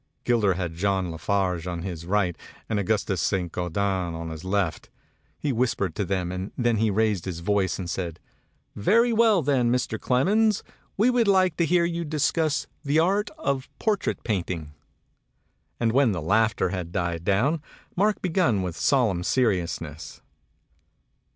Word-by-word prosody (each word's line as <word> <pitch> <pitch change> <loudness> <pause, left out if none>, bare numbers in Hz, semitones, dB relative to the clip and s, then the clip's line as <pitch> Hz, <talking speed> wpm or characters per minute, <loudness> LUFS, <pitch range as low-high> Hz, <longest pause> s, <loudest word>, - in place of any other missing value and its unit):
Gilder 110 -6 +2
had 90 -3 -3
John 95 0 0
La 80 - -6
Farge 90 -1 -1
on 85 -2 -4
his 85 -3 -6
right 95 -3 +1 0.3
and 105 -2 0
Augustus 100 -3 0
Saint 90 -2 0
Gaudens 90 0 -1
on 80 0 -5
his 80 +1 -8
left. 95 -3 -1 0.5
He 145 -3 -1
whis 125 +1 +1
pered 95 -5 -2
to 100 - -2
them 90 -2 -1
and 95 +2 -5
then 120 -2 +2
he 110 +1 +2
raised 105 -3 +1
his 85 -3 -5
voice 100 +1 +1
and 95 - -5
said, 85 -2 -4 0.6
"Very 230 - +3
well 220 -6 +4
then, 130 -4 +2
Mr. 120 -3 -1
Clemens, 205 - +2 0.3
we'd 235 +1 +3
like 185 -4 +4
to 170 - +2
hear 175 0 +3
you 170 0 -2
discuss 155 0 0 0.2
the 145 +1 +1
art 195 +6 +2
of 140 - -2
portrait 215 -3 -1
painting." 90 -7 -3 1.1
And 115 -1 +2
when 130 -3 +3
the 90 - -2
laughter 110 +2 +2
had 90 -2 -4
died 85 -3 -2
down, 125 - +1 0.3
Mark 210 +3 +1
began 165 - +2
with 90 -3 -4
solemn 115 -11 +2
seriousness. 95 -8 -1
105 Hz, 155 wpm, -25 LUFS, 90-145 Hz, 1.1 s, well